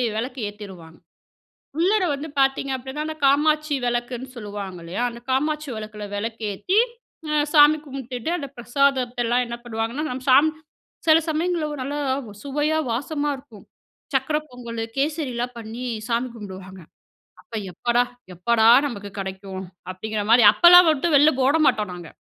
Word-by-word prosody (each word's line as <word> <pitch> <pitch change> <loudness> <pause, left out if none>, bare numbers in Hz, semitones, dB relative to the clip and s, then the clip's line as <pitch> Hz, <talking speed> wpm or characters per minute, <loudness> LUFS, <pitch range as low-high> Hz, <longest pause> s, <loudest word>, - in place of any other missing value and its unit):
விளக்கு 250 +4 -4
ஏத்திருவாங்க. 190 -6 -11 0.8
உள்ளற 380 +4 +3
வந்து 290 +3 -6
பார்த்தீங்க 270 0 +1
அப்பிடின்னா, 265 +4 -5
அந்த 315 0 -5
காமாட்சி 300 +2 +3
விளக்குன்னு 240 +1 -2
சொல்லுவாங்க, 205 -4 -6
இல்லையா? 175 +8 -3
அந்த 235 0 -10
காமாட்சி 300 +3 0
விளக்கில 215 -1 -7
விளக்கு 225 +2 -4
ஏத்தி, 370 - 0 0.5
அ - - -1 0.2
சாமி 300 0 +7
கும்பிட்டுட்டு 260 0 -5
அந்த 280 -3 -6
பிரசாதத்தெல்லாம் 245 -1 +1
என்ன 235 0 -5
பண்ணுவாங்கன்னா? 230 +5 -3
நம்ம 255 +1 -5
சாமி 285 +5 +6 0.6
சில 315 0 +7
சமயங்கள்ல 330 +1 0 0.2
நல்லா 285 +3 -3 0.5
சுவையா 295 +3 0
வாசமா 290 +4 -2
இருக்கும். 250 -7 -15 0.5
சக்கரை 270 +3 +1
பொங்கலு, 235 -2 -6
கேசரிலாம் 270 -5 -2
பண்ணி 225 +2 -7 0.3
சாமி 240 +2 0
கும்பிடுவாங்க. 190 -3 -9 0.6
அப்ப, - - -27 0.2
எப்படா, 240 +7 +1 0.3
எப்படா 220 +5 +3 0.2
நமக்கு 205 -6 -7
கிடைக்கும்? 190 0 -6 0.3
அப்பிடிங்கிற 210 +3 -4
மாரி 240 0 +7
அப்பலாம் 355 +3 +8
மட்டும் 310 +1 +1
வெளில 300 +2 +5
ஓட 290 +4 +4
மாட்டோம், 210 -3 +1
நாங்க. 175 -2 -9
250 Hz, 135 wpm, -23 LUFS, 220-295 Hz, 0.8 s, அப்பலாம்